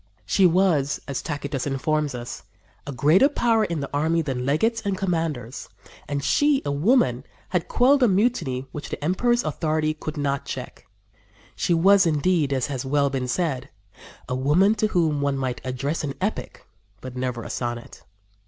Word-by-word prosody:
"She 190 -2 +4
was," 165 -6 +2
as 140 -2 -3
Tacitus 145 -3 -4
informs 145 +1 -1
us, 120 0 -7 0.5
"a - - -3
greater 155 - +4
power 230 -6 +2
in 170 -7 -2
the 140 - -4
army 160 +3 +1
than 130 -3 -3
legates 225 +11 +1
and 200 -2 -2
commanders, 160 - -3 0.4
and 140 -1 -3
she, 290 - +2
a 145 - -1
woman, 140 - +2 0.3
had 180 -2 -1
quelled 270 +3 +3
a 245 - +6
mutiny 190 - 0
which 150 - -7
the - - -6
emperor's 240 +9 +1
authority 155 0 -1
could 155 0 -7
not 140 -1 -1
check." - - -7 0.7
She 180 -2 +1
was, 195 +2 +5
indeed, 155 -1 +1
as 130 -2 0
has 135 -3 -4
well 140 +1 +1
been 130 -2 -2
said, 140 -2 -2 0.6
"a 125 - -3
woman 150 +11 +3
to 215 0 0
whom 160 -7 +1
one 140 -1 0
might 130 -2 -3
address 135 +5 -3
an 140 -2 -3
epic - - -4 0.3
but 130 -1 -9
never 125 -2 -3
a - - -6
sonnet." 120 -1 -5
150 Hz, 170 wpm, -24 LUFS, 135-185 Hz, 0.7 s, a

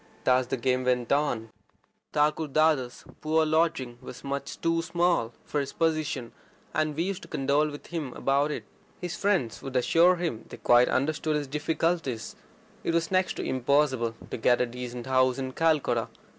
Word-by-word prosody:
And 130 0 +4
so - - -19
the 135 - -1
game 130 +1 +1
went 125 -2 0
on. 125 -6 0 0.6
His 150 -3 +1 0.2
poor 160 +1 +2
lodging 155 -6 0
was 125 -1 -10
much 140 0 -4
too 165 0 +1
small 170 -7 +1
for 150 - -1
his 140 -1 -3
position, 155 -6 -1 0.4
and 155 -1 0
we 165 - 0
used 195 0 -3
to - - -11
condole 140 +3 +1
with 145 0 -9
him 160 -6 -4
about 140 +2 +1
it. 150 - -4 0.4
His 175 -2 -4
friends 185 - 0
would 135 -1 -7
assure 170 +8 +5
him 165 -10 -3
they - - -9
quite 120 +1 +5
understood 155 +3 0
his 150 -1 -1
difficulties: 150 -3 -1 0.5
it 165 - 0
was 165 0 0
next 185 0 +2
to - - -4
impossible 130 -3 +1 0.2
to - - -2
get 120 +2 +3
a 125 - +3
decent 125 0 -6
house 130 -1 +3
in 130 -1 -3
Calcutta. 160 0 +1
145 Hz, 170 wpm, -27 LUFS, 125-160 Hz, 0.6 s, assure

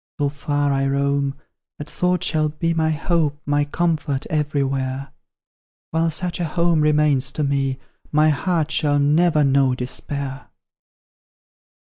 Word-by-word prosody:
Though 145 -3 +1
far 145 0 -1
I 135 0 +1
roam, 140 0 0 0.4
that 145 - -7
thought 180 +3 0
shall 155 -3 +1
be 165 +2 -1
My 160 -1 +1
hope, 155 -1 0
my 145 0 +1
comfort, 150 -3 -1
everywhere; 140 -3 -1 0.8
While 165 +1 +1
such 175 +2 -3
a 175 - 0
home 170 0 +1
remains 150 -3 +2
to 155 - -1
me, 135 -2 0 0.3
My 155 +1 +4
heart 160 +2 0
shall 145 -1 +1
never 150 +2 +3
know 135 -2 +3
despair! 135 +2 -5
145 Hz, 130 wpm, -21 LUFS, 140-160 Hz, 0.8 s, My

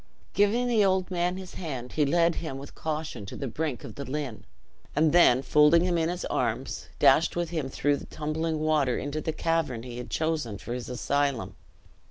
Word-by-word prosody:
Giving 210 +5 +3
the 230 -4 +3
old 190 -1 +1
man 180 +1 0
his 185 -1 -9
hand, 130 -8 -5
he 150 -2 +2
led 170 +3 +3
him 160 -6 -5
with 140 +1 -9
caution 155 -7 -4
to - - -7
the 140 - -4
brink 135 -2 -3
of - - -8
the 140 - -6
Lynn; 135 -5 -5 0.5
and 155 0 +4
then, 135 -7 +5
folding 150 +4 +5
him 180 -1 +1
in 165 -1 +1
his 180 0 -3
arms, - - -2
dashed - - +4
with 175 -1 -2
him 155 -6 -2
through 145 +2 +1
the - - -10
tumbling 155 +1 -2
water 150 -5 +2
into 145 +2 -3
the 160 - -1
cavern 160 -8 -1
he 125 -1 -7
had 125 - -7
chosen 155 -10 -1
for 120 +4 -6
his 125 -1 -5
asylum. 140 0 -1
155 Hz, 200 wpm, -27 LUFS, 135-170 Hz, 0.5 s, then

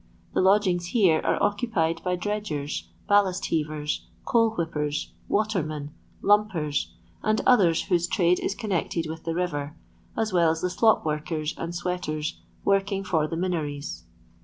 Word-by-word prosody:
The - - +2
lodgings 185 -2 +3
here 180 -7 +4
are - - +2
occupied 195 -7 0
by 180 0 0
dredgers, 180 -7 -3 0.2
ballast 195 -2 +3
heavers, 150 -1 -1 0.2
coal 230 -1 +4
whip 165 -1 -2
pers, 150 0 -2
watermen, 155 -9 -1 0.3
lumpers, 195 -8 +2 0.3
and 215 0 +1
others 185 -10 +5
whose 175 -2 +1
trade 175 0 +2
is 200 - -2
connected 180 -6 -1
with 160 +1 -7
the 165 -1 -1
river, 155 -4 -2 0.4
as 220 -3 0
well 170 -2 +4
as 160 0 -1
the 180 - 0
slop 220 +2 +3
workers 155 0 -2
and 170 +1 -5
sweaters 165 -4 -3 0.2
working 195 0 +2
for 160 -5 +1
the 165 - -4
Minories. 155 -5 -3
175 Hz, 145 wpm, -26 LUFS, 155-200 Hz, 0.4 s, others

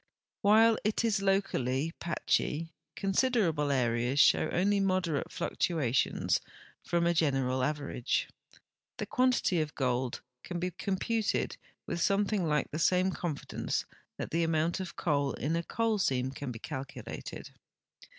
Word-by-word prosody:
Wdiile 220 +2 +6
it 215 +2 +1
is 215 -3 +1
locally 165 -7 0
patchy, 165 -1 -1 0.2
considerable 195 - +1
areas 120 +1 +1
show - - +5
only 200 +3 +2
moderate 185 -6 0
fluctuations 140 -8 0 0.4
from 170 0 +1
a 170 - +3
general 135 -5 +1
average. 145 -3 -1 0.7
The - - -3
quan 255 0 +3
tity 180 -8 +1
of 155 0 -4
gold 125 -2 -1 0.2
can 175 - -5
be 180 +1 -2
computed 210 +4 -1 0.3
with 170 - -3
something 200 -2 +2
like 150 -2 0
the 155 - -3
same 185 +2 +3
con 170 -4 -2
fidence - - -3 0.3
that - - -5
the 165 - +1
amount 165 +1 +1
of 185 -2 -6
coal 145 -4 0
in 155 +4 -1
a 170 - +1
coal 225 +4 0
seam 130 -6 +1
can 140 -1 -5
be 115 - -6
calculated. 135 +2 -7
165 Hz, 140 wpm, -31 LUFS, 140-195 Hz, 0.7 s, Wdiile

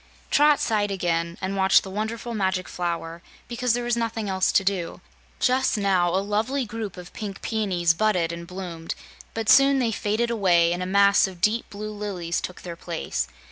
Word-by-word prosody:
Trot 295 0 +5
sighed 210 -2 +1
again 170 -3 -1
and 190 +1 -2
watched 190 -1 +4
the 190 - -8
wonderful 220 +3 -4
Magic 190 -3 -1
Flower, 170 -1 -4 0.3
because 240 0 0
there 245 0 -1
was 240 0 +1
nothing 230 -2 -2
else 190 -1 +1
to 195 - +3
do. 190 -3 -2 0.4
Just 255 -2 +2
now 190 -4 +2
a 190 +3 0
lovely 225 +6 0
group 215 -3 -6
of 180 0 -10
pink 200 -2 -6
peonies 185 -7 +1
budded 180 -3 +1
and 170 0 -7
bloomed, 175 -3 -6 0.4
but 225 -1 -3
soon 275 +2 +6
they 240 -4 +1
faded 220 +3 -1
away, 175 -6 +3
and 175 - -4
a 180 - -2
mass 200 +1 +5
of 185 -2 -10
deep 215 +6 +1
blue 215 +1 -6
lilies 195 -5 -3
took 185 - -7
their 170 -2 -6
place. 170 -1 -3
200 Hz, 185 wpm, -24 LUFS, 175-220 Hz, 0.4 s, soon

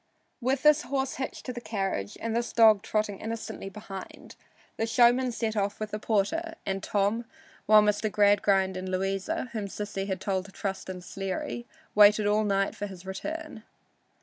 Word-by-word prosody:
With 265 +3 0
this 300 0 +6
horse 270 -1 -2
hitched 265 - -5
to 250 - -4
the 240 - -6
carriage 195 - -3
and 230 0 -2
this 235 0 -1
dog 220 -3 +6
trotting 210 -2 -1
innocently 220 -3 -5
behind, 195 -1 -9 0.4
the 225 - 0
showman 245 +2 +4
set 225 -2 -2
off 200 -1 -1
with 215 -1 -4
the 210 - -3
porter 235 +12 0
and 195 0 -2
Tom, 205 +4 0 0.4
while 215 0 +8
Mr. 210 +1 +1
Gradgrind 200 -2 +3
and 185 0 -4
Louisa, 195 +5 -2
whom 215 -3 -3
Sissy 200 -1 -4
had 190 -2 -2
told 190 -1 -1
to 200 - -12
trust 195 -1 -4
in 185 -1 -6
Sleary, 195 - -4 0.3
waited 210 0 +6
all 210 +1 +3
night 195 -1 +1
for 205 - -4
his 190 -2 -11
return. 305 +8 -5
210 Hz, 175 wpm, -28 LUFS, 195-230 Hz, 0.4 s, while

